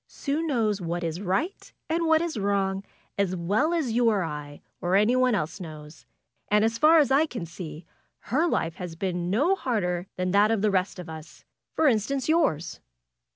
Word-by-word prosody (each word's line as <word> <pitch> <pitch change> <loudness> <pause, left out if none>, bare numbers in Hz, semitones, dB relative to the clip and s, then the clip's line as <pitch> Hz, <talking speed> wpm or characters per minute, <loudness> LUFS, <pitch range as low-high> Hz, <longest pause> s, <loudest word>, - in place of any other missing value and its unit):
'^Sue 295 +3 -2
knows 225 - 0
what 175 0 -3
is 165 +2 -3
right 205 - -2 0.2
and 330 +1 0
what 320 0 +4
is 340 -4 -3
wrong, 195 -1 0 0.4
as 190 -2 +1
well 205 - +1
as 320 -8 0
you 235 +1 +3
or 205 -4 +1
I, 150 -2 -6 0.2
or 180 0 +1
anyone 245 +4 +3
else 160 0 -3
knows. 155 -4 -10 0.4
And 210 +1 +4
as 225 +1 -1
far 315 +2 +6
as 290 -4 +4
I 295 +4 +4
can 235 - -5
see 165 -1 -9 0.5
her 315 +6 +3
life 165 - -1
has 175 -3 -6
been 175 0 -2
no 285 - +3
harder 185 - -1
than 185 0 -1
that 205 +2 +4
of 220 -2 0
the 210 - +3
rest 190 0 0
of 180 -1 -8
us; 160 0 -11 0.3
for 320 - +2
instance 255 +2 +1
yours. 310 - +1
200 Hz, 190 wpm, -26 LUFS, 175-265 Hz, 0.5 s, far